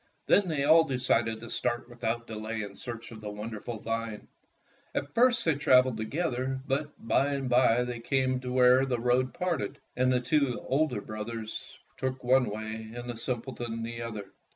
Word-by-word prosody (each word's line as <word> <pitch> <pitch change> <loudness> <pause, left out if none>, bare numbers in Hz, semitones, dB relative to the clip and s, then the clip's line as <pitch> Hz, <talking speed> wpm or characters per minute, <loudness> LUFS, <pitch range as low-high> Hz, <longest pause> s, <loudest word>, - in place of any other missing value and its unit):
Then 200 -2 +4
they 155 -4 0
all 160 +3 +7
decided 120 -5 +1
to 115 - -8
start 120 0 -1
without 120 -1 -3
delay 110 0 -4
in 100 -1 -7
search 115 -2 -7
of 110 -2 -10
the 105 - -5
wonderful 110 +2 -5
vine. 115 0 -4 0.7
At 140 +1 -2
first 245 0 +4
they 160 - +4
traveled 130 -4 +4
together, 130 +1 -2
but 145 +2 -1 0.2
by 140 +4 +3
and 135 -2 -2
by 125 -1 +4
they 125 -1 -4
came 130 +1 +1
to 125 -1 -5
where 125 +1 +5
the 125 -3 0
road 125 +2 +2
parted, 170 - -2 0.2
and 130 +1 +3
the 125 - +3
two 125 0 +1
elder 135 -6 +2
brothers 110 +1 -6 0.2
took 130 0 -3
one 125 -1 +4
way, 110 +1 -5
and 120 0 -6
the 120 - -4
simpleton 120 -1 -3
the 115 0 -5
other. 110 -4 -6
125 Hz, 175 wpm, -29 LUFS, 115-130 Hz, 0.7 s, all